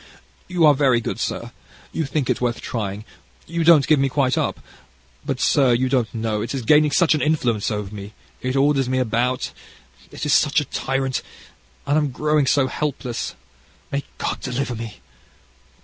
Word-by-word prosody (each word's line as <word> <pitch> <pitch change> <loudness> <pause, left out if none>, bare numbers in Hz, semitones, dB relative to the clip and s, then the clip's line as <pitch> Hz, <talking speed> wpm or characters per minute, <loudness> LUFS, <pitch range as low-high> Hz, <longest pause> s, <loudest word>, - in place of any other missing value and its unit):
"You 175 -3 +2
are 150 - +7
very 135 -4 +3
good, 115 - -4
sir; - - -3 0.4
you 160 - -2
think 140 -1 -1
it - - 0
worth 120 -1 0
trying, 105 -2 -4 0.4
you 170 0 -2
don't 160 -4 +6
give 155 -3 +4
me 135 0 +2
quite 130 -1 +1
up; - - -1 0.6
but, - - -3
sir, 135 -4 +4
you 130 +2 +1
don't 125 -4 +1
know, 110 -2 -2
it 115 +5 -3
is 130 - -3
gaining 150 +5 +5
such 160 +3 +3
an 155 - 0
influence 125 -9 +1
over 105 -2 -4
me: 100 0 -8 0.3
it 130 +1 -2
orders 135 -2 +2
me 130 - 0
about, 125 +1 0 0.6
it - - -5
is 150 - +2
such 145 0 +4
a 145 - -3
tyrant, 135 0 -2 0.6
and 145 +2 +2
I'm 150 -2 0
growing 150 +2 +1
so 135 0 +3
helpless. 130 -3 -3 0.6
May 140 0 -1
God - - -2
deliver 125 0 -2
me!" 115 -2 -7
130 Hz, 180 wpm, -22 LUFS, 120-150 Hz, 0.6 s, are